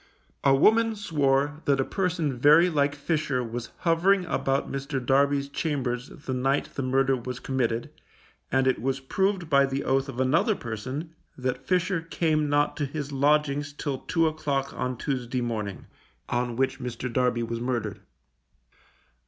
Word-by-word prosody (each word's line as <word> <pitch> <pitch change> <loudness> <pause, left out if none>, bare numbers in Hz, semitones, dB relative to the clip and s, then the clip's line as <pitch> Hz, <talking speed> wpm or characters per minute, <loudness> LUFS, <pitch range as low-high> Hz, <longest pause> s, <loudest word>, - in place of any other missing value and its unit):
A 135 -1 +5
woman 225 +9 +4
swore 145 -6 +1
that 140 -1 +2
a - - +3
person 175 -7 -1
very 150 +8 +6
like 145 -2 +1
Fisher 145 -4 -1
was 115 0 -5
hovering 180 +3 +3
about 135 -4 0
Mr. 135 0 -3
Darby's 140 +1 +3
chambers 135 -4 -2
the 145 -3 -6
night 135 +2 0
the - - -3
murder 135 +1 +2
was 125 0 -5
committed, 120 -3 -1 0.6
and 130 +1 +3
it 130 -3 +1
was 135 +2 -1
proved 190 +5 0
by 140 -2 +4
the 135 +1 -2
oath 135 +1 +1
of 125 - -6
another 160 - +3
person 130 - -5 0.2
that 130 0 -3
Fisher 185 -1 +1
came 155 -2 0
not 145 0 +2
to 145 - 0
his 145 0 -5
lodgings 145 0 +1
till 140 -2 -3
two 165 -2 +1
o'clock 145 -3 -1
on 125 -1 -3
Tuesday 125 -2 -2
morning, 110 -5 -3 0.4
on 120 -1 -1
which 130 +1 0
Mr. 125 0 -5
Darby 125 -2 +1
was 115 0 -3
murdered. 120 -2 -2
140 Hz, 155 wpm, -26 LUFS, 130-155 Hz, 0.6 s, very